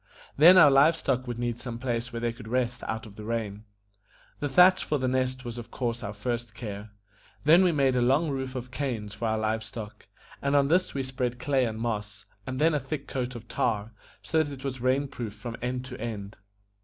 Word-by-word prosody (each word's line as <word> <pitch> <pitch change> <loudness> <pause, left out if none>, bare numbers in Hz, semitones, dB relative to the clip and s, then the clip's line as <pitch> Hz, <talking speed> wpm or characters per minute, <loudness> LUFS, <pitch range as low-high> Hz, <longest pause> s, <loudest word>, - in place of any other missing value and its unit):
Then 170 +6 +8
our 145 -6 +9
live 145 +5 +6
stock 130 -5 -1
would 120 -1 -4
need 120 -1 -2
some 120 -2 -5
place 120 -1 -2
where 115 - -4
they 120 0 -1
could 115 -2 -11
rest 125 +1 -1
out 110 +1 -3
of 105 -2 -13
the 105 - -7
rain. 110 -2 -3 0.7
The 145 - -1
thatch 180 +5 +6
for 150 - 0
The 130 -2 -1
Nest 130 0 -1
was 120 0 -5
of 120 0 -9
course 120 -1 -2
our 105 -3 -4
first 115 +2 -4
care; 105 -2 -6 0.5
then 165 +5 +7
we 180 - +4
made 135 -4 +2
a 125 - +2
long 140 +6 +3
roof 130 -1 -4
of 125 0 -5
canes 120 -7 -3
for 115 - -3
our 110 0 +1
live 110 0 -1
stock, 110 -1 -9 0.3
and 140 +1 +1
on 140 -1 +4
this 180 0 +2
we 135 - -1
spread 130 -2 -2
clay 130 0 +1
and 110 -1 -4
moss, 105 -3 -4 0.2
and 130 0 -3
then 160 +1 +4
a 150 - +2
thick 140 +2 -5
coat 125 -1 -3
of 115 0 -9
tar, 110 -3 -1 0.3
so 160 - +2
that 145 -2 -3
it 135 -1 -9
was 130 -2 -4
rain 130 +3 +2
proof 115 -6 -6
from 115 +2 -6
end 125 +1 -2
to 130 -1 -8
end. 105 -3 -5
125 Hz, 230 wpm, -28 LUFS, 115-135 Hz, 0.7 s, our